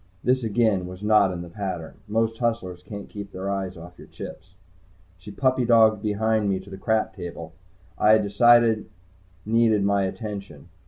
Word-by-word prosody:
This 130 Hz, 0 st, +2 dB
again 110 Hz, -4 st, +1 dB
was 90 Hz, +2 st, -10 dB
not 105 Hz, -2 st, +4 dB
in 90 Hz, -1 st, -5 dB
the -, -, -9 dB
pattern. 90 Hz, -3 st, -6 dB
Most 115 Hz, +1 st, 0 dB
hustlers 115 Hz, -7 st, -2 dB
can't 100 Hz, +2 st, -8 dB
keep 100 Hz, -2 st, -8 dB
their 95 Hz, +1 st, -4 dB
eyes 95 Hz, -2 st, -3 dB
off 90 Hz, +2 st, -12 dB
your -, -, -12 dB
chips. -, -, -10 dB, 0.6 s
She 95 Hz, -, -11 dB
puppy 130 Hz, +4 st, +1 dB
dogged 110 Hz, -3 st, +4 dB
behind 110 Hz, 0 st, 0 dB
me 95 Hz, -1 st, 0 dB
to 100 Hz, +1 st, -14 dB
the -, -, -6 dB
crap 110 Hz, 0 st, 0 dB
table 85 Hz, -2 st, -8 dB, 0.5 s
I 105 Hz, -, +5 dB
had 110 Hz, -1 st, +4 dB
decided 115 Hz, +1 st, +4 dB, 0.6 s
needed 110 Hz, -2 st, +3 dB
my 100 Hz, -1 st, +2 dB
attention. 100 Hz, 0 st, -7 dB
105 Hz, 170 wpm, -24 LUFS, 95-110 Hz, 0.6 s, I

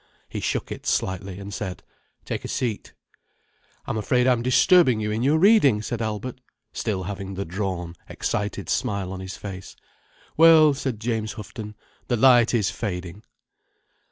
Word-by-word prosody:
He -, -, -5 dB
shook -, -, -2 dB
it -, -, -7 dB
slightly, 95 Hz, 0 st, -1 dB
and 100 Hz, 0 st, -8 dB
said: 95 Hz, -2 st, -5 dB, 0.4 s
"Take -, -, -4 dB
a -, -, -5 dB
seat." 115 Hz, -5 st, -3 dB, 0.9 s
"I'm -, -, -3 dB
afraid 125 Hz, +4 st, +2 dB
I'm 125 Hz, -2 st, +3 dB
disturbing 130 Hz, -, +4 dB
you 105 Hz, 0 st, -2 dB
in 110 Hz, +2 st, -1 dB
your 145 Hz, +5 st, +3 dB
reading," 160 Hz, -, +5 dB
said 115 Hz, 0 st, -4 dB
Albert, 110 Hz, +4 st, -4 dB, 0.3 s
still 100 Hz, -5 st, -2 dB
having 95 Hz, 0 st, -6 dB
the 100 Hz, +1 st, -3 dB
drawn, 90 Hz, -2 st, -4 dB, 0.2 s
excited 100 Hz, -3 st, -3 dB
smile 100 Hz, -3 st, -1 dB
on 95 Hz, -, -6 dB
his 95 Hz, +1 st, -7 dB
face. 95 Hz, -2 st, -8 dB, 0.6 s
"Well—" 160 Hz, -2 st, +7 dB
said 130 Hz, -5 st, -4 dB
James 110 Hz, -1 st, -2 dB
Houghton. 105 Hz, 0 st, -8 dB, 0.3 s
"The 120 Hz, -, +1 dB
light 120 Hz, -1 st, +6 dB
is 110 Hz, -6 st, +1 dB
fading." 90 Hz, -2 st, -5 dB
105 Hz, 155 wpm, -24 LUFS, 95-125 Hz, 0.9 s, Well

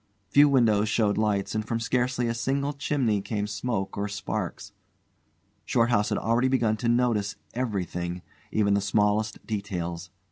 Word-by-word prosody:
Few 145 Hz, +1 st, +6 dB
windows 110 Hz, -6 st, +3 dB
showed 105 Hz, -2 st, +2 dB
lights, 105 Hz, -2 st, 0 dB
and 110 Hz, 0 st, -1 dB
from 115 Hz, +1 st, -2 dB
scarcely 125 Hz, +1 st, 0 dB
a 115 Hz, -, 0 dB
single 140 Hz, +5 st, -1 dB
chimney 130 Hz, -7 st, 0 dB
came 105 Hz, 0 st, -2 dB
smoke 105 Hz, -1 st, -3 dB
or 100 Hz, 0 st, -2 dB
sparks. 100 Hz, 0 st, -4 dB, 0.9 s
Shorthouse 115 Hz, -3 st, +2 dB
had 105 Hz, -, 0 dB
already 115 Hz, +3 st, +2 dB
begun 120 Hz, -5 st, +2 dB
to 115 Hz, +1 st, -1 dB
notice 115 Hz, -5 st, +1 dB, 0.2 s
everything, 90 Hz, -7 st, -3 dB, 0.3 s
even 100 Hz, -2 st, +2 dB
the 100 Hz, -, +2 dB
smallest 105 Hz, +2 st, 0 dB
details. 90 Hz, -5 st, -4 dB
110 Hz, 145 wpm, -26 LUFS, 100-120 Hz, 0.9 s, Few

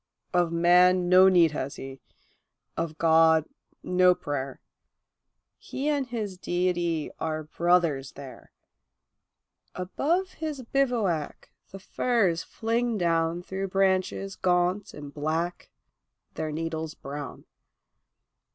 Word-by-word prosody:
Of 175 Hz, -2 st, +2 dB
man 180 Hz, +1 st, +4 dB
no 185 Hz, +1 st, +7 dB
need 175 Hz, -4 st, +5 dB
has 140 Hz, -2 st, -4 dB
he, 135 Hz, 0 st, -9 dB, 0.7 s
of 160 Hz, -2 st, -3 dB
God, 160 Hz, -1 st, +4 dB, 0.4 s
no 180 Hz, 0 st, +4 dB
prayer; 135 Hz, -4 st, -4 dB, 1.0 s
He 280 Hz, +3 st, -3 dB
and 285 Hz, -3 st, 0 dB
his 210 Hz, -6 st, -5 dB
Deity 175 Hz, -3 st, -1 dB
are 155 Hz, -1 st, -2 dB
brothers 165 Hz, -4 st, +1 dB
there. 135 Hz, -2 st, -12 dB, 1.2 s
Above 325 Hz, -, -1 dB
his 305 Hz, -5 st, -5 dB
bivouac 230 Hz, -, -1 dB, 0.2 s
the 195 Hz, -, -9 dB
firs 195 Hz, -4 st, 0 dB
fling 230 Hz, 0 st, -1 dB
down 165 Hz, -1 st, 0 dB
Through 190 Hz, +2 st, -4 dB
branches 195 Hz, 0 st, 0 dB
gaunt 180 Hz, +2 st, 0 dB
and 145 Hz, -1 st, -9 dB
black, 160 Hz, +4 st, -3 dB, 0.6 s
their 155 Hz, -1 st, -4 dB
needles 160 Hz, 0 st, -4 dB
brown. 145 Hz, +1 st, -8 dB
175 Hz, 105 wpm, -27 LUFS, 160-195 Hz, 1.2 s, no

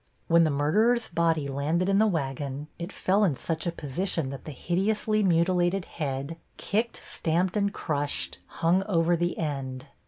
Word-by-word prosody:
When 170 Hz, 0 st, +5 dB
the -, -, +2 dB
murderer's 215 Hz, +12 st, +2 dB
body 165 Hz, -3 st, +1 dB
landed 150 Hz, +6 st, 0 dB
in 195 Hz, 0 st, +3 dB
the 220 Hz, -, +5 dB
wagon 140 Hz, -4 st, -3 dB
it 170 Hz, +3 st, -5 dB
fell 200 Hz, +3 st, +2 dB
in 170 Hz, -9 st, +3 dB
such 165 Hz, +5 st, -3 dB
a -, -, +1 dB
position 160 Hz, -1 st, -2 dB
that 135 Hz, -, -8 dB
the 155 Hz, -, -5 dB
hideously 210 Hz, -, 0 dB
mutilated 180 Hz, 0 st, +2 dB
head, 140 Hz, +1 st, -4 dB, 0.2 s
kicked, 225 Hz, +3 st, -1 dB
stamped 170 Hz, +2 st, -1 dB
and 200 Hz, -1 st, +1 dB
crushed, 145 Hz, -6 st, -3 dB
hung 170 Hz, +3 st, +2 dB
over 170 Hz, -3 st, +3 dB
the 175 Hz, +1 st, -1 dB
end. 135 Hz, -4 st, -3 dB
170 Hz, 160 wpm, -27 LUFS, 145-190 Hz, 0.2 s, When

